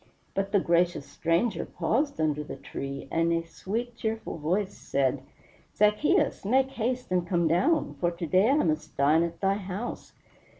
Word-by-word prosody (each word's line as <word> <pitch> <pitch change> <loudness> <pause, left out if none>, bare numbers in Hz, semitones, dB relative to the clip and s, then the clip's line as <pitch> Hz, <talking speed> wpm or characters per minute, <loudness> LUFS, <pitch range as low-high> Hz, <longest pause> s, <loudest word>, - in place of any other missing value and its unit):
But 195 0 -1
the 200 - +4
gracious 175 -3 +1
Stranger 170 +8 0
paused 285 - -1
under 150 -1 0
the - - -7
tree, 135 0 -6
and 165 +1 +2
a 165 0 +1
sweet, 225 +8 -4
cheerful 220 -6 -4
voice 185 +6 0
said, 135 -1 0 0.5
"Zaccheus, 210 - +2
make 260 +6 +2
haste 250 -2 -2
and 180 -1 +1
come 170 -2 +2
down, 185 - +2
for 175 - +2
to 170 0 -5
day 185 - +4
I 275 - +4
must 155 -1 -2
dine 145 +4 +4
at 170 0 -3
thy 195 0 +3
house." 200 +4 -6
180 Hz, 165 wpm, -28 LUFS, 165-220 Hz, 0.5 s, the